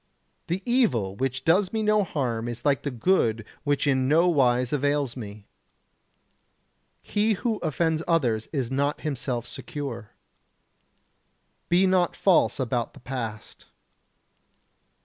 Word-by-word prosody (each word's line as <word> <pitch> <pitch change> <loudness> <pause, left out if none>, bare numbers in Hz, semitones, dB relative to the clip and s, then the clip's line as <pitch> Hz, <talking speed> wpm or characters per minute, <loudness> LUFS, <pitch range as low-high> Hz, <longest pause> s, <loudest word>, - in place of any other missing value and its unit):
The 180 +3 -2
evil 200 - +1
which 130 +3 -2
does 180 +3 +3
me 220 -1 -1
no 210 -1 +3
harm 120 -9 -2
is 120 +2 -6
like 140 -2 +2
the 145 - -3
good 115 - +1 0.2
which 145 0 0
in 130 -2 +2
no 165 +5 +4
wise 125 -5 +2
avails 145 -2 0
me. 105 -4 -9 1.6
He 215 +1 +1
who 220 +2 -1
offends 160 0 0
others 120 -10 +1
is 135 -5 -2
not 140 +2 0
himself 130 -5 -3
secure. 120 -2 -6 1.6
Be 180 +2 +4
not 185 -2 +2
false 190 -6 +3
about 120 -2 -2
the - - -12
past. 115 -4 -6
140 Hz, 125 wpm, -26 LUFS, 120-170 Hz, 1.6 s, no